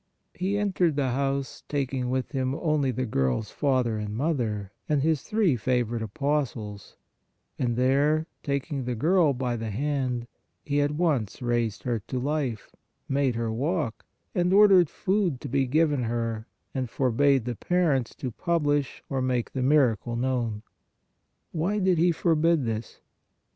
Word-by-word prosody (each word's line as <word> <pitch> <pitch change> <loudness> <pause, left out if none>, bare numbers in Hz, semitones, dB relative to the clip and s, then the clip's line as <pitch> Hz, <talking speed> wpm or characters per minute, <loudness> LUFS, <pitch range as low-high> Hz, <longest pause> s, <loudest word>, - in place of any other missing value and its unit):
He 190 +3 -1
entered 185 -6 +1
the 140 -2 +1
house 135 +1 -2
taking 135 -3 -1
with 130 0 -1
Him 130 -1 -1
only 150 -4 +1
the 130 +1 -1
girl 65 - +1
s 110 - -6
father 125 -6 +1
and 105 0 -4
mother 115 - -1 0.2
and 145 -3 +2
His 160 -2 +2
three 210 - +2
favorite 120 -1 0
apostles, 110 -4 -3 0.6
and 120 -2 0
there 140 +5 +2 0.2
taking 140 -1 -2
the 125 -1 -2
girl 165 - +3
by 125 -2 -2
the 115 -1 -4
hand, 130 0 -1 0.4
He 145 -1 +1
at 145 - +2
once 150 - 0
raised 120 -3 -1
her 120 -3 -1
to 130 - -3
life, 135 -5 -2 0.4
made 135 -3 +1
her 115 -1 -1
walk, 145 -1 -1 0.3
and 180 0 +1
or 205 +2 +8
dered 180 -5 +6
food 190 -8 0
to - - -5
be 135 0 +1
given 150 0 +2
her 115 -1 -2 0.3
and 130 -3 -2
forbade 135 +1 +2
the 125 - -2
parents 150 - +1
to 130 - -4
publish 145 -1 0
or 135 -2 -1
make 125 -2 0
the 130 - -2
miracle 125 -5 +2
known. 120 -4 -1 0.9
Why 175 +6 0
did 185 -4 +2
He 175 +1 +4
forbid 165 -3 +2
this? 110 0 -4
135 Hz, 155 wpm, -27 LUFS, 120-155 Hz, 0.9 s, or